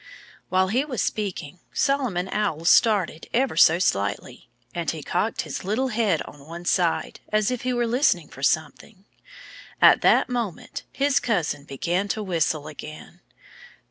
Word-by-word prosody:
While 185 0 +2
he 250 +7 +1
was 265 -7 -5
speaking, 180 -6 -3
Solomon 255 -11 0
Owl 190 -7 -2
started 190 -5 +3
ever 260 +1 +1
so 160 - +6
slightly. 100 - -2 0.2
And - - -2
he - - -4
cocked - - -1
his - - -5
head 215 -3 0
on 145 0 -14
one 170 +2 -8
side, 175 -2 0
as 215 +1 +2
if 250 - -3
he 255 - -1
were 240 -1 0
listening 230 - +1
for 135 - -12
something. 160 +7 -2 0.7
At - - +7
that - - +4
moment 235 -8 -4
his 280 0 +2
cousin 160 -10 -1
began 175 +8 -2
to 215 +1 -2
whistle 165 -5 -1
again. 155 0 -10
190 Hz, 145 wpm, -24 LUFS, 160-235 Hz, 0.7 s, At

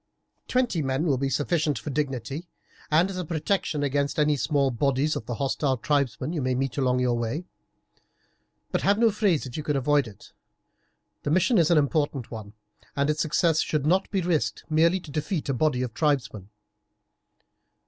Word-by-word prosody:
Twenty 245 -10 +1
men 135 +3 -1
will 140 -6 +1
be 135 0 0
sufficient 150 +1 0
for 150 - -5
dignity, 140 +2 -3 0.4
and 160 +4 +4
as 185 - -6
a 180 - -2
protection 160 -1 -1
against 140 0 0
any 150 -1 +3
small 140 -1 +1
bodies 140 +4 +1
of 110 - -5
the 120 - -3
hostile 135 +1 0
tribesmen 140 +4 -1
you 160 - -2
may 130 -1 0
meet 135 +1 -2
on 125 -1 +2
your 125 -1 +1
way; 120 +9 -3 1.3
but - - 0
have 200 +1 +3
no 230 0 +4
frays 195 -8 +1
if 125 +1 -7
you - - -2
can 150 -1 -1
avoid 140 0 +2
it. 100 -3 -14 0.9
The - - -3
mission 185 - +3
is 165 - +3
an 170 - +4
important 145 -3 0
one, 105 -3 -8 0.4
and 140 +1 +2
its 150 - -2
success 160 +1 +2
should 150 -3 -1
not 185 +5 +2
be 195 -2 0
risked 170 -3 0
merely 165 +4 +3
to 165 -4 -11
defeat 155 +1 -2
a - - +2
body 130 -1 +1
of 120 -3 -4
tribesmen. 130 - -1
145 Hz, 180 wpm, -26 LUFS, 135-165 Hz, 1.3 s, and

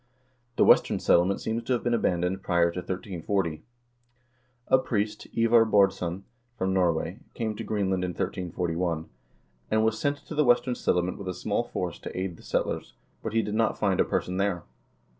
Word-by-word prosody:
The - - +4
Western - - +5
Settlement 90 +3 +3
seems 110 +1 -2
to 130 - +1
have 120 - -1
been 120 - +1
abandoned 90 -3 0
prior 85 -2 +2
to 90 - -4
1340. 90 -2 -2 1.1
A - - +7
priest, 105 -4 -2
Ivar 115 0 +5
Baardsson, 95 -4 +2 0.3
from 95 -4 0
Norway, 85 +1 +1 0.2
came 110 -3 -2
to - - -5
Greenland 95 -3 0
in 90 - -1
1341, 85 -2 -2 0.6
and 110 0 +2
was 110 0 +1
sent 145 +3 0
to - - -7
the 150 0 +3
Western 125 0 +3
Settlement 90 -5 0
with 100 - -7
a 90 - -3
small - - -1
force - - -4
to - - -7
aid 95 -3 -3
the - - -16
settlers, - - -2 0.3
but 110 - -4
he 115 0 +2
did 105 0 -4
not 110 0 +1
find 95 -3 +1
a - - +6
person 90 +1 -2
there. 95 -3 0
95 Hz, 180 wpm, -27 LUFS, 90-110 Hz, 1.1 s, A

